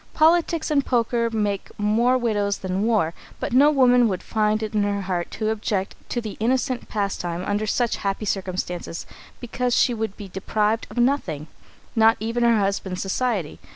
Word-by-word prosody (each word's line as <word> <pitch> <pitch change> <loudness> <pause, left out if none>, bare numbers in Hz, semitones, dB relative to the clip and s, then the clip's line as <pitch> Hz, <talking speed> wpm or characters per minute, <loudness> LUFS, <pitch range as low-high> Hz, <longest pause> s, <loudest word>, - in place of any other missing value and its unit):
Politics 325 0 +3
and 280 -2 +3
poker 235 -2 +1
make 210 -3 -2
more 230 +5 +3
widows 205 -4 0
than 185 0 -2
war, 210 -7 +2 0.3
but - - -3
no 280 +4 +6
woman 250 -4 +5
could 185 -3 -3
find 215 0 0
it 215 - -4
in 210 - +2
her 205 0 0
heart 180 -2 -2
to 215 -1 -2
object 205 -3 -2 0.2
to 240 - -1
the 220 -3 -6
innocent 250 +2 0
pastime 185 -4 -2
under 205 +1 -1
such 240 +2 0
happy 200 +2 -2
circumstances, 185 -3 -3 0.3
because 245 0 -1
she 245 - +3
would 220 -3 -3
be 205 - -8
deprived 210 +4 -1
of - - -12
nothing 240 - +1 0.5
not 225 0 +5
even 230 +2 -2
her 235 -1 +4
husband's 195 -2 -1
society. 195 -4 -1
215 Hz, 170 wpm, -23 LUFS, 195-240 Hz, 0.5 s, no